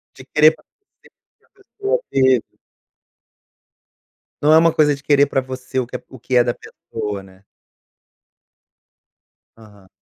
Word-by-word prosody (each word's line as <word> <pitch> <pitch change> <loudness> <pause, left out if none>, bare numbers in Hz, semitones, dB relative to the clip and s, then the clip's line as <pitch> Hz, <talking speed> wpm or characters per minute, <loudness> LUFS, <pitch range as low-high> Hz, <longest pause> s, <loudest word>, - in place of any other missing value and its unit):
De 130 - -13
querer 155 +1 +5
para - - -25
você 410 0 -29
o - - -36
que 395 - -26
pessoa 420 +4 -2
teve. 130 -3 +1 1.9
Não 150 +1 +5
é - - +8
uma 165 +1 +4
coisa 150 -2 +3
de 135 - -15
querer 145 0 +3
para 135 -1 -1
você 130 0 -5
o 125 - -3
que - - -9
é - - -6
o 130 - -13
que 130 +2 -3
é 120 - +6
da 120 0 -1
pessoa, 100 -4 -7
né. 95 0 -19 2.1
Aham. 105 -4 -18
130 Hz, 155 wpm, -19 LUFS, 120-155 Hz, 2.1 s, é